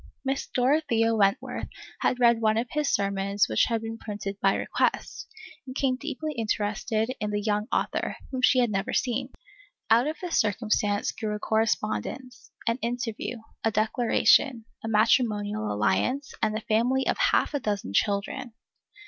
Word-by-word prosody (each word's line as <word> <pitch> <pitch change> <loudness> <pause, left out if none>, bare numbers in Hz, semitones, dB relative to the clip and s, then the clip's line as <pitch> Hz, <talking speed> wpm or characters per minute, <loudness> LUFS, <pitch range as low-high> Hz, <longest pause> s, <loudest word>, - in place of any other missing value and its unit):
Miss 270 +1 -1
Dorothea 245 -4 +2
Wentworth 200 -3 +1 0.3
had 250 - +1
read 235 -2 +4
one 215 0 +3
of 230 - +1
his 300 -1 0
sermons 200 0 +1
which 110 -1 +3
had 225 -1 -1
been 225 0 -5
printed 205 -2 -5
"by 195 0 +3
request," - - -1 0.4
and 255 - -7
became 265 -2 +1
deeply 300 +2 -4
interested 220 0 -1
in 210 - -2
the 205 0 -1
young 210 0 -1
author, - - -1 0.2
whom 260 -1 -3
she 255 - +5
had 240 -3 +3
never 200 +5 -2
seen. 255 +1 0 0.6
Out 235 +4 +5
of 310 +1 -3
this 355 -2 0
circumstance 210 -2 +1
grew 210 -1 -3
a - - -5
correspondence, 225 +3 -2 0.2
an 230 +1 +2
interview, 235 -1 -3 0.2
a 225 - +3
declaration, 225 +2 +3 0.2
a - - -4
matrimonial 215 -1 +2
alliance, 105 - 0
and 215 0 +1
a - - -5
family 245 +5 +1
of - - 0
half - - +2
a 285 - 0
dozen 205 - -3
children. 210 - -1
225 Hz, 155 wpm, -27 LUFS, 210-250 Hz, 0.6 s, she